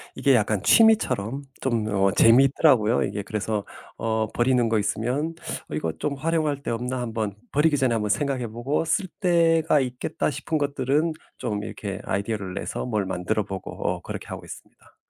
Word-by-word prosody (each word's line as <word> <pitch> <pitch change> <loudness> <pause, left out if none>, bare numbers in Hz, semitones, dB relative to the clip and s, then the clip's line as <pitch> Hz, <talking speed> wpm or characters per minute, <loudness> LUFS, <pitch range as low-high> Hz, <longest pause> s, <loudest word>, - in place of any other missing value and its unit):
이게 135 -3 +3
약간 105 -3 +1
취미처럼 140 - +4 0.2
좀 120 -4 0
어 100 -1 +2
재밌더라고요. 125 - +5
이게 100 - -3
그래서 105 0 -2 0.3
어 110 -1 0
버리는 120 -1 +2
거 110 - +2
있으면 125 +9 -1 0.4
'어 - - -7
이거 80 +1 -1
좀 150 - -3
활용할 150 -1 0
데 - - -5
없나?' 125 +2 -2
한번 110 -3 -2 0.2
버리기 150 +1 +3
전에 130 -3 +2
한번 105 -2 -1
생각해 130 +3 0
보고 120 +8 -1
'쓸 185 +4 0
데가 165 -4 +3
있겠다.' 125 +4 -2
싶은 155 +1 -2
것들은 145 +3 0 0.3
좀 105 -1 -2
이렇게 100 -1 -6
아이디어를 100 -1 -2
내서 100 - -4
뭘 105 -5 -1
만들어 95 +3 -1
보고 95 -2 -6
어 - - -1
그렇게 - - -7
하고 - - -7
있습니다. - - -13
120 Hz, 360 characters per minute, -25 LUFS, 105-145 Hz, 0.4 s, 재밌더라고요